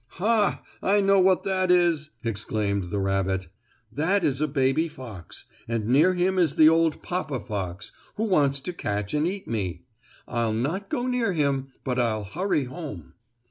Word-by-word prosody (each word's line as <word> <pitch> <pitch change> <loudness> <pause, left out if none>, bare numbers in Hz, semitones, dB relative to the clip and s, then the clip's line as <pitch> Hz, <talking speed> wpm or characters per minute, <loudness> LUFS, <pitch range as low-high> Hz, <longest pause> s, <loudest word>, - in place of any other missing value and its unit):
"Ha! 210 +2 +1 0.2
I 205 +2 +3
know 195 0 +4
what 185 0 +4
that 185 -1 0
is!" 170 -4 +3
exclaimed 105 -3 -1
the 95 +4 -4
rabbit. 95 -2 -1 0.4
"That 175 - +1
is 140 -1 0
a 155 - +2
baby 135 +3 +1
fox, 115 - -10 0.2
and 115 -2 -2
near 150 +10 +4
him 185 +1 +1
is 160 -5 +2
the 155 -2 +7
old 165 -1 +2
papa 165 -7 -2
fox, 95 -5 -5 0.2
who 215 - -2
wants 145 -10 +2
to 180 - -5
catch 105 - -3
and 150 +2 +1
eat 195 +2 -4
me. 95 -6 -3 0.4
I'll 115 -2 -1
not 165 - -2
go 245 - -1
near 250 -5 0
him, 140 -4 0 0.2
but 125 -1 -1
I'll 110 -3 0
hurry 155 - -1
home." 130 - -8
145 Hz, 170 wpm, -25 LUFS, 110-180 Hz, 0.4 s, the